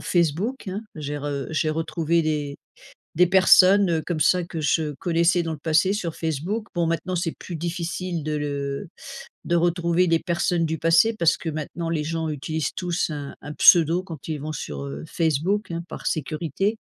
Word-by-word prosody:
Facebook, 180 - 0
hein. 195 +4 -4
J'ai 145 -1 -4
re 140 -1 -3
j'ai 155 0 0
retrouvé 165 +1 0
des 150 -2 -2 0.6
des 180 +3 +5
personnes, 190 +1 +6
heu, 160 -1 0
comme 170 -3 -2
ça 180 +3 +3
que 170 -1 -5
je 155 0 +1
connaissais 170 +3 +1
dans 165 -1 -3
le 155 - -6
passé 160 +4 +2
sur 175 -6 -3
Facebook. 170 +8 -2
Bon, 170 -1 +1
maintenant, 165 +3 -2
c'est 170 -2 -1
plus 175 - -6
difficile 170 +1 -3
de 155 +1 -3
le 140 0 -3 0.6
de 175 - +1
retrouver 170 +1 +2
des 165 -1 +3
personnes 170 -1 0
du 160 0 -2
passé 165 +8 +4
parce 170 -4 +3
que 165 - -4
maintenant 155 +2 -4
les 160 -2 -1
gens 160 0 -2
utilisent 150 +1 -3
tous 175 -1 -1
un 145 -2 -6
un 145 - -7
pseudo 170 +3 +6
quand 165 -7 -9
ils 155 -2 -3
vont 155 +2 -5
sur, 70 - -5
heu, 70 +1 -6
Facebook, 170 +6 0
hein, 170 0 -4
par - - -8
sécurité 165 - -1
165 Hz, 185 wpm, -24 LUFS, 155-175 Hz, 0.6 s, personnes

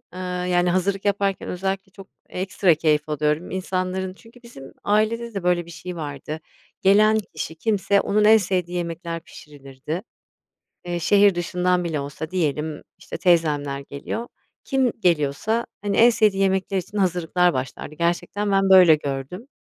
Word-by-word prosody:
ııı, 180 -1 -3
yani, 175 0 +2
hazırlık 195 +2 0
yaparken 200 -1 0
özellikle 190 +1 -3
çok 195 -1 -13 0.2
ekstra 185 -2 +1
keyif 155 -1 +1
alıyorum 150 +2 -1
insanların 185 0 -2
çünkü 235 +4 -19
bizim 135 - -12
ailede 220 +2 0
de, 195 -3 -4
böyle, 175 -1 +1
bir 170 - -12
şey 180 +1 -7
vardı 150 0 -6 0.4
gelen 215 +3 +5
kişi 155 +1 -5
kimse, 200 +1 +1
onun 210 +1 +1
en 220 +1 +8
sevdiği 180 -3 -1
yemekler 170 0 -4
pişirilirdi. 145 +3 -8 0.8
Eee, 175 -1 -3
şehir 200 +2 +4
dışından 180 +1 0
bile 155 -4 -2
olsa 145 +3 -6
diyelim, 155 -3 -2 0.2
işte, - - -7
teyzemler 150 -5 +1
geliyor, 140 +12 -6 0.4
kim 265 -4 +1
geliyorsa, 175 +7 +1 0.2
hani, 200 -1 -1
en 235 +2 +7
sevdiği 210 -4 +2
yemekler 190 0 +1
için 200 +3 -5
hazırlıklar 180 -1 +2
başlardı 130 +3 -5
gerçekten 175 +5 -1
ben, 195 0 +2
böyle, 180 -4 +8
gördüm. 145 - -6
180 Hz, 145 wpm, -23 LUFS, 160-195 Hz, 0.8 s, en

